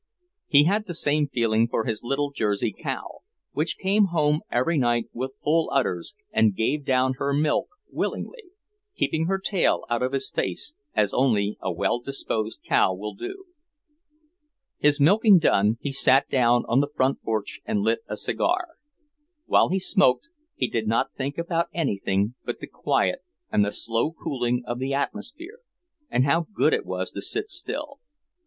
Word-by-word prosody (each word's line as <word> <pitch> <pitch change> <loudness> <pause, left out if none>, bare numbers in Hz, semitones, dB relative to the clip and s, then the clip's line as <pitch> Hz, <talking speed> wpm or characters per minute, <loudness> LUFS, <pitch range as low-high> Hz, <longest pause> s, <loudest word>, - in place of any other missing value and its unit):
He 145 0 +6
had 205 +6 +1
the 175 - -4
same 150 -1 +1
feeling 115 -3 +1
for 115 -1 -1
his 110 -2 -2
little 140 +3 -1
Jersey 105 -6 0
cow, - - -6 0.3
which 155 +2 -1
came 200 +2 +3
home 155 -4 +1
every 130 +8 +1
night 120 -2 +2
with 130 +2 -4
full 160 +2 +2
udders 90 -11 -1 0.2
and 110 -3 +3
gave 140 +8 0
down 130 -1 +2
her 140 0 0
milk 150 +1 +1 0.2
willingly, 470 -4 -4 0.5
keeping 160 +1 0
her 195 +1 +1
tail 190 -1 +1
out 120 - +1
of 130 +1 -1
his 135 -1 -2
face, 300 - -3 0.2
as 105 -2 +2
only 105 -6 +2
a - - -2
well 120 - 0
disposed 115 -4 -4
cow 95 - +3
will 105 +2 -6
do. 385 - -7 1.4
His 145 0 +3
milking 200 +7 +6
done, 110 - +3
he 140 - -3
sat 135 0 +4
down 120 -2 +3
on 120 - +3
the 145 +1 +1
front 130 +1 +1
porch 110 -2 -3
and 105 - -1
lit 115 +2 +1
a 105 - -4
cigar. 355 - 0 0.8
While - - +4
he 190 - +1
smoked, 190 - +2 0.3
he 130 - 0
did 115 -2 -2
not 115 +1 +1
think 140 +1 -4
about 170 0 -1
anything 100 - 0
but - - -4
the - - -6
quiet - - 0 0.3
and 105 - +3
the 100 - -1
slow 115 +7 0
cooling 125 -6 -2
of 120 0 -4
the 135 +1 -1
atmosphere, 255 - -5 0.5
and 125 - +2
how 165 +4 +2
good - - +2
it - - -1
was - - -3
to - - -6
sit 420 0 -2
still. 300 -6 -4
135 Hz, 170 wpm, -25 LUFS, 115-170 Hz, 1.4 s, He